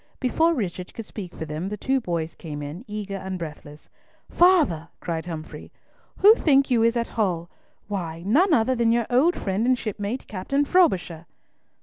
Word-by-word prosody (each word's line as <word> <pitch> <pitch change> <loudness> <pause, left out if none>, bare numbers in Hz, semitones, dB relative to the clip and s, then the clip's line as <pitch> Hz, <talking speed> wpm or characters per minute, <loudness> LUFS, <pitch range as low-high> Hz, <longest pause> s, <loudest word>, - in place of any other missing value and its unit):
Before 320 +6 +2
Richard 180 - -4
could 225 - -6
speak 195 -5 -8
for 160 - -5
them, 155 +5 -4
the 210 - -5
two 265 +5 0
boys 170 -5 -3
came 150 -3 -7
in, 150 +9 -7
eager 205 -2 -5
and 190 0 -5
breathless. 150 -3 -9 0.4
"Father!" 310 - +3
cried 165 0 -4
Humfrey, 160 -2 -8 0.5
"who 415 +3 +8
think 275 - +3
you 235 -2 +4
is 230 +1 +3
at 235 - -1
Hull? 175 -6 -1 0.4
Why, 170 -5 -4
none 320 - +3
other 255 -3 +3
than 235 -2 +2
your 235 0 +2
old 290 +9 +4
friend 195 +2 -2
and 255 0 +3
shipmate, 215 +2 -4
Captain 275 +9 -1
Frobisher!" 185 - +2
205 Hz, 170 wpm, -24 LUFS, 170-255 Hz, 0.5 s, who